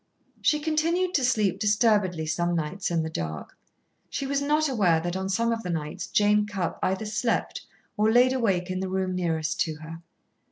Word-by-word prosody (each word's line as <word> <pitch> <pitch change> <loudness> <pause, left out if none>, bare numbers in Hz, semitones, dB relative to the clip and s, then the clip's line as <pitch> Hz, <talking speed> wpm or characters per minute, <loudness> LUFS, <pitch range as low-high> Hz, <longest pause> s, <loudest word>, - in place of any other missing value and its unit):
She 300 - +3
continued 330 +4 0
to 275 - +2
sleep, 210 -7 +1
disturbedly 205 -5 +2
some 175 +2 0
nights, 170 +4 -2
in 165 -2 0
the 160 - -3
dark. 80 - -5 0.5
She 275 - -3
was 280 +1 0
not 300 +2 +2
aware 195 - +2
that 175 +2 -3
on 190 0 -3
some 230 +4 +1
of 230 -1 -1
the 180 - -6
nights 155 -3 -4
Jane 210 0 +3
Cupp 195 -5 -3
either 190 +3 -1
slept 215 +2 -2 0.3
or 215 +1 +3
laid 250 +2 +5
awake 195 -8 0
in 185 - -2
the 190 0 -3
room 190 0 -1
nearest 165 -4 -1
to 160 - 0
her. 160 +2 -9
195 Hz, 190 wpm, -26 LUFS, 175-235 Hz, 0.5 s, laid